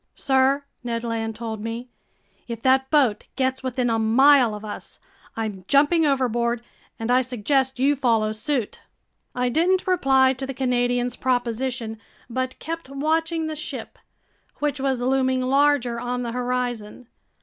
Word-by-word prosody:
"Sir," 270 +1 +2 0.2
Ned 230 -1 -3
Land 225 -1 -3
told 220 -2 -5
me, 230 +2 -5 0.6
"if 235 -2 -5
that 265 0 +3
boat 260 -9 +2
gets 260 0 0
within 255 -1 -1
a 225 -1 +1
mile 245 +1 +5
of 210 +1 -8
us, 210 - -8 0.4
I'm 210 -4 -4
jumping 300 +3 +4
overboard, 240 -3 0 0.3
and 225 +2 -2
I 255 +1 +5
suggest 260 +2 0
you 275 +3 +3
follow 230 -5 +1
suit." 220 +1 -2 0.6
I 250 0 +1
didn't 355 +7 +2
reply 270 -8 +4
to 265 +1 -6
the 270 - -5
Canadian's 245 -1 0
proposition 245 -2 -2 0.3
but 260 +1 -2
kept 330 -3 -6
watching 320 +4 0
the 315 0 -3
ship, 310 +3 -7 0.6
which 290 -1 -1
was 265 -2 0
looming 260 0 +1
larger 260 -2 +2
on 245 +1 -3
the 235 - -3
horizon. 245 -2 -3
255 Hz, 145 wpm, -23 LUFS, 235-275 Hz, 0.6 s, mile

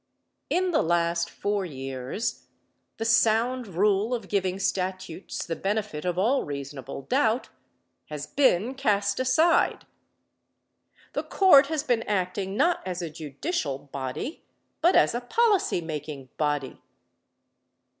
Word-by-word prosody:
In 365 0 +1
the 325 - +3
last 170 0 +1
four 205 -1 -2
years 135 - -4 0.5
the 225 - -3
sound 230 +2 +3
rule 200 +5 +1
of 225 -5 -7
giving 190 -2 0
statutes 185 -2 -3
the 165 - -3
benefit 200 -5 -2
of 180 -1 -1
all 235 +9 +2
reasonable 140 -2 -6
doubt 245 -2 +1 0.6
has 150 -1 -6
been 245 - +2
cast 205 -6 +1
aside. 285 +7 +3 1.3
The - - -1
Court 300 -8 +6
has 310 -1 -1
been 245 -6 +1
acting 190 0 -1
not 345 0 +2
as 180 -1 -4
a 165 - -5
judicial 150 - -3
body, 140 - -6 0.4
but 350 - +4
as - - +5
a 240 - -2
policy 405 - +2
making 150 -4 -6
body. 145 -3 -2
195 Hz, 125 wpm, -26 LUFS, 160-245 Hz, 1.3 s, Court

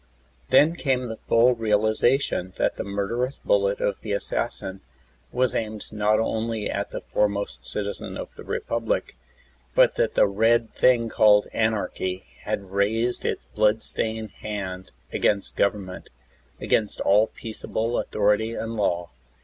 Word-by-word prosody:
Then 160 +3 +5
came 130 -6 0
the 110 - -6
full 120 +2 +5
realization 110 -2 +1
that - - +1
the - - -4
murderous 115 +7 -2
bullet 100 0 +1
of 100 - -1
the 105 - -3
assassin 95 -1 -2 0.5
was 125 0 +1
aimed 110 -2 -4
not 105 0 +2
only 110 -1 -1
at - - -2
the - - -6
foremost 100 -1 -1
citizen 100 -1 -3
of - - -7
the - - -11
Republic, 115 -1 -2 0.6
but - - +5
that - - +1
the - - +6
Red 115 +3 +2
Thing 120 -2 +3
called 105 -2 +4
Anarchy 95 -4 -1 0.2
had 100 -2 -3
raised 110 +5 0
Its - - -2
blood 110 +1 +1
stained 110 -1 -3
hand 95 -3 -5 0.2
against 100 -2 +1
govern 100 -1 +1
ment, 90 - -10 0.5
against 105 -2 0
all 105 +3 +4
peaceable 115 +1 -3
authority 105 +2 +1
and 115 0 -4
law. 85 -5 -1
110 Hz, 140 wpm, -25 LUFS, 100-115 Hz, 0.6 s, the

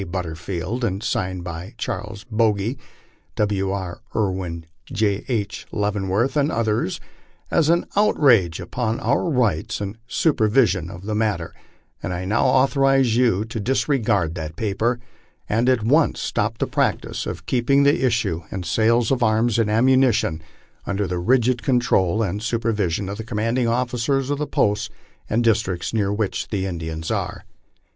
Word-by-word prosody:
But 90 +1 -2
terfield, 90 +8 -4
and 100 -2 -1
signed 95 -4 -2
by 90 +5 -7
Charles 105 -3 -5
Bogy, 110 +2 +1 0.6
W. 100 -2 0
B. 95 -3 -3 0.2
Irwin, 95 -5 -2 0.3
J. 100 -1 0
H. 105 -5 -3
Leavemvorth, 105 +4 0
and 145 +1 +2
others, 110 -4 0 0.5
as 160 -2 +3
an 170 +1 +3
outrage 125 - +4
upon 115 -2 -2
our 140 +9 +1
rights 115 - 0
and 105 +2 -5
supervision 110 - +2
of 90 -1 -9
the 105 +2 -3
matter, 105 -6 -1 0.5
and 90 - -3
I 90 +1 -4
now 110 +8 +1
authorize 135 -2 +3
you 115 -5 +2
to 115 0 -5
disregard 105 - +1
that 80 -1 -6
paper, 110 +4 0 0.5
and 115 +4 +2
at 125 -4 +2
once 145 +7 +3
stop 115 +1 -1
the - - 0
practice, - - -1 0.2
keeping 135 +3 +2
the 140 -1 +3
issues 110 -9 +1
and 95 -2 -5
sales 115 +6 +2
of 130 -2 +1
arms 110 0 +2
and 110 -2 +2
ammunition 120 -7 +3 0.5
under 100 0 0
the 90 -1 -2
rigid 120 +4 +2
control 115 -6 +2
and 100 +1 -2
supervision 105 -5 -1
of 100 +2 -5
the - - -3
commanding 115 +2 0
officers 125 +3 0
of 145 - -1
the 150 - -2
posts 105 +2 +1 0.4
and 115 +3 +1
districts 110 -6 0
near 100 -3 +1
which 105 -1 -2
the 95 -3 -2
In 90 -3 -4
dians 80 0 -3
are. - - -4
110 Hz, 150 wpm, -22 LUFS, 95-120 Hz, 0.6 s, outrage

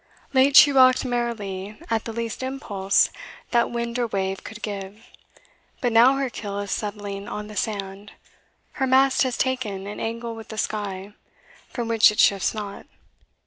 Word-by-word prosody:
Late 270 +1 +4
she 290 - +9
rocked 255 -1 +5
merrily 215 -5 -3
at 225 -1 0
the 230 - -4
least 230 +1 -4
impulse 215 -8 +1 0.4
That 235 -1 +2
wind 235 0 -3
or 240 - +1
wave 195 -2 -3
could 225 0 -10
give; 205 +1 -6 0.7
but 245 - 0
now 240 +4 +6
her 275 0 -1
keel 205 -4 -6
Is 205 -1 -4
settling 205 -1 -4
on 210 - -5
the 210 0 -10
sand, 200 -1 -4 0.7
her 265 - +3
mast 265 +1 +4
has 255 -2 0
ta'en 225 -7 -2
An 205 +1 -7
angle 230 +1 -4
with 225 -1 -10
the 220 - -8
sky, 205 -2 -3 0.6
from 240 -2 -4
which 230 -1 +6
it 210 - -8
shifts 195 -2 +4
not. 205 -2 -7
220 Hz, 165 wpm, -24 LUFS, 200-240 Hz, 0.7 s, she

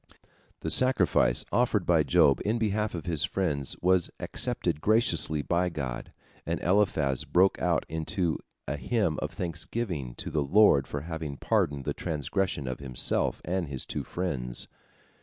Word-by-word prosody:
The - - -3
sacrifice 130 - +3
offered 115 -6 +2
by 85 -3 +4
Job 70 -1 +4
in 110 +3 0
behalf 105 -2 -1
of 80 -3 -6
his 80 -4 +1
friends 75 -5 -1
was 90 -1 +3
accepted 75 - -2
graciously 85 -9 +2
by 90 +3 +1
God, 65 -7 -5 0.3
and - - -2
Eliphaz 85 -9 +2
broke 95 +2 +2
out - - +1
into 80 +2 -1 0.3
a 70 +3 -2
hymn 100 -3 0
of - - -2
thanksgiving 85 - -4
to - - -6
the 75 - 0
Lord 70 -3 +5
for 70 - -4
having 80 -3 -5
pardoned 70 -2 0
the - - -1
transgression 80 -1 -2
of 65 - -4
himself 65 -3 -1
and 90 0 -1
his 65 -2 -4
two - - -4
friends. 65 -10 -3
80 Hz, 150 wpm, -28 LUFS, 70-95 Hz, 0.3 s, Lord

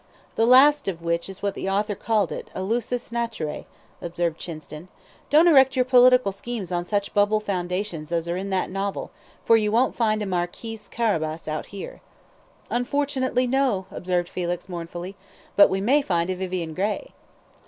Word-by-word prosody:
"The 225 - +2
last 280 +2 +6
of 170 -3 -3
which 170 +2 -1
is 195 +1 -10
what 200 -1 0
the 195 - -4
author 205 +2 0
called 210 -1 0
it, - - -6
a 185 - -3
LUSUS 240 +4 -2
NATURAE," 230 -10 -3 0.3
observed 170 -1 -2
Chinston. 155 0 -8 0.4
"Don't 310 +4 +6
erect 270 -5 +6
your 255 -1 +2
political 250 -3 +5
schemes 200 -1 -6
on 175 0 -1
such 200 +1 -2
bubble 205 +1 +3
foundations 180 -4 -3
as 170 -1 -1
are 170 - -1
in 195 +2 -4
that 190 -1 -1
novel, 195 +1 -3 0.3
for 230 - +6
you 210 -1 0
won't 240 +4 +2
find 215 -2 +1
a - - -3
Marquis 190 +5 -3
Carabas 160 -9 -1
out 155 0 -3
here." 200 -1 -9 0.7
"Unfortunately, 260 0 0
no!" 250 -7 +1
observed 180 -1 -1
Felix, 175 0 -4
mournfully; 175 +1 -6 0.4
"but 205 - +7
we 190 - -1
may 260 +9 +3
find 175 -7 0
a - - -2
Vivian 180 -3 -4
Grey." 210 - -2
200 Hz, 170 wpm, -24 LUFS, 175-235 Hz, 0.7 s, but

